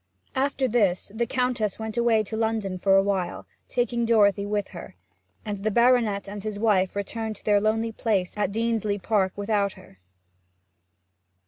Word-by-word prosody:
After 265 0 0
this, 205 -7 +1
the 235 +1 -1
Countess 250 -5 0
went 220 -1 -5
away 235 -2 +3
to 215 +2 -6
London 220 -4 -1
for 195 +1 +3
a 195 - +5
while, 190 -3 -2 0.2
taking 240 -1 0
Dorothy 205 -3 +3
with 205 -1 -2
her; - - -10 0.5
and 205 -1 -3
the 210 +2 0
baronet 235 -3 +3
and 205 +1 -6
his 215 0 -4
wife 200 -4 +2
returned 220 +2 -3
to - - -19
their 205 -1 +3
lonely 225 +2 0
place 205 -5 -1
at 210 -2 -1
Deansleigh 215 -2 -1
Park 200 -4 +1
without 205 -1 0
her. 185 - -17
215 Hz, 160 wpm, -25 LUFS, 200-230 Hz, 0.5 s, a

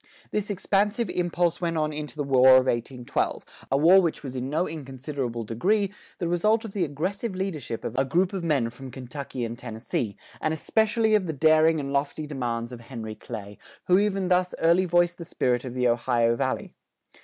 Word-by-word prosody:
This 210 -1 -2
expansive 205 +2 0
impulse 175 -1 0
went 170 -1 -1
on 155 0 0
into 150 0 -5
the 150 - -2
War 130 -1 +6
of 130 - +3
1812, 120 0 -2 0.3
a 135 - +4
war 175 +6 +7
which 165 -4 -2
was 130 -2 -6
in 130 +1 -3
no 160 +5 0
inconsiderable 135 -5 -5
degree, 195 - 0 0.2
the 175 - -2
result 215 +7 +2
of 205 - -8
the 195 - 0
aggressive 185 - -3
leadership 160 - -4
of - - -4
a 135 - +3
group 175 +8 +1
of 190 -3 -3
men 140 -8 +1
from 130 +2 -10
Kentucky 130 0 -6
and 115 +1 -6
Tennessee, 110 -2 -4 0.2
and 155 0 0
especially 220 +6 +1
of 205 -4 +3
the 160 - -2
daring 155 +2 +4
and 140 -1 -4
lofty 145 +2 -1
demands 120 -5 -3
of 125 - -8
Henry 115 -3 -7
Clay, 105 -2 -8 0.3
who 180 +1 +5
even 195 -2 0
thus 180 0 +2
early 170 +3 +4
voiced 175 0 +2
the - - -5
spirit 125 -6 0
of 125 -1 -6
the 125 -1 +2
Ohio 120 -1 +2
Valley. 130 +1 -2
150 Hz, 190 wpm, -26 LUFS, 125-180 Hz, 0.3 s, war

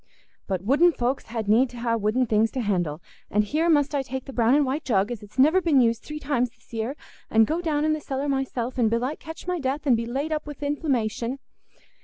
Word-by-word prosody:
But 190 -2 -2
wooden 295 - +4
folks 250 +1 -1
had 225 -2 -4
need 235 +5 +4
ha' 235 -1 -1
wooden 225 +4 +1
things 220 0 +2
t' 260 - -3
handle. 175 -7 -1 0.3
And 210 +1 +2
here 310 +10 0
must 290 -2 +3
I 285 - +1
take 265 0 -5
the 270 - -9
brown 240 +2 +3
and 295 -1 +3
white 275 +4 -2
jug, 205 -3 +1
as 235 - -5
it's 210 +3 -15
niver 310 +8 +5
been 320 -6 +3
used 230 -2 +2
three 300 - -7
times 270 -5 0
this 235 - -29
year, 230 +5 -2 0.3
and 220 0 +5
go 320 +9 -1
down 305 -3 0
i' - - +2
the 310 - -3
cellar 275 0 -3
myself, 265 -2 -2
and 225 -2 +4
belike 245 +6 -1
catch 320 +1 -9
my 360 -1 -1
death, 280 +1 -2
and 260 -4 +5
be 230 0 -2
laid 275 +6 -2
up 305 -1 -2
wi' 295 - -6
inflammation...." 265 -5 -1
260 Hz, 235 wpm, -25 LUFS, 230-290 Hz, 0.3 s, niver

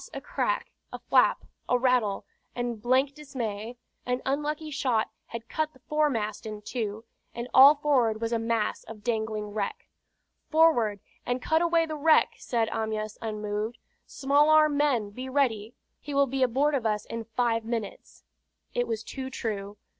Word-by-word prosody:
a - - -3
crack, - - -2 0.2
a - - -5
flap, - - +3 0.2
a 250 - +4
rattle; 245 -5 +1 0.3
and 240 -3 -3
blank 260 +4 +2
dismay! 240 -6 -5 0.3
An 250 0 -1
unlucky 300 +3 -2
shot 250 -6 0 0.2
had 230 0 -7
cut 310 +4 -2
the 260 - -20
foremast 240 -9 0
in 210 -1 -7
two, 220 -2 -4 0.3
and 235 +1 -4
all 275 +3 +9
forward 255 -7 +2
was 230 +1 -2
a 230 - +1
mass 225 -1 -1
of 215 -2 -11
dangling 220 -2 -2
wreck. 220 - -4 0.6
"Forward, 245 - +3 0.2
and 245 +1 -1
cut 320 +5 +1
away 335 -1 +3
the 310 -1 -5
wreck!" 315 +2 +4
said 230 -3 0
Amyas, 215 -1 -3
unmoved. 215 +1 -3 0.3
"Small 285 +2 +2
arm 305 -1 +5
men, 260 -8 +1
be 255 +5 -7
ready. 240 -5 0 0.2
He 290 -1 -6
will 280 0 +5
be 270 0 -3
aboard 265 +4 +2
of 250 -5 +1
us 210 -1 -1
in 230 0 -5
five 230 0 0
minutes!" 225 -2 -5 0.5
It 245 0 0
was 225 -1 -3
too 265 +2 -6
true. 205 -5 -4
240 Hz, 160 wpm, -27 LUFS, 220-280 Hz, 0.6 s, all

